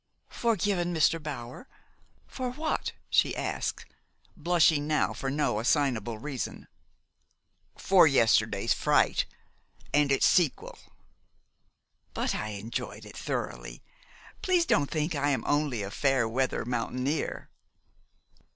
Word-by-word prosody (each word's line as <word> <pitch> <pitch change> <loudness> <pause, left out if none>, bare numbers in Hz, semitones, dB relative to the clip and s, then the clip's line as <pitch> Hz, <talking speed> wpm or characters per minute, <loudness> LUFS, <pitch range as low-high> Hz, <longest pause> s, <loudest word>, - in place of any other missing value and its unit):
"Forgiven, 195 -6 0
Mr. 160 +1 +3
Bower? 145 - -7 0.6
For 255 -1 -4
what?" 310 +3 -2
she - - +2
asked, - - -3 0.5
blushing 160 -4 +3
now 155 -1 +1
for 135 - -4
no 140 -6 0
assignable 120 -4 0
reason. 135 +2 -5 1.1
"For 185 -4 +5
yesterday's 120 -6 +3
fright, - - +2 0.7
and 145 -1 +3
its 135 - +3
sequel." 170 -7 +1 1.4
"But - - -1
I 110 - -3
enjoyed 110 +4 -6
it - - -12
thoroughly. - - -5 0.6
Please 360 -2 +2
don't 145 - +2
think 155 +1 -1
I 145 -1 0
am 140 - 0
only 145 -7 0
a 100 - -6
fair 135 -1 +1
weather 130 +3 -1
mountaineer." 125 +4 -2
145 Hz, 110 wpm, -28 LUFS, 125-165 Hz, 1.4 s, For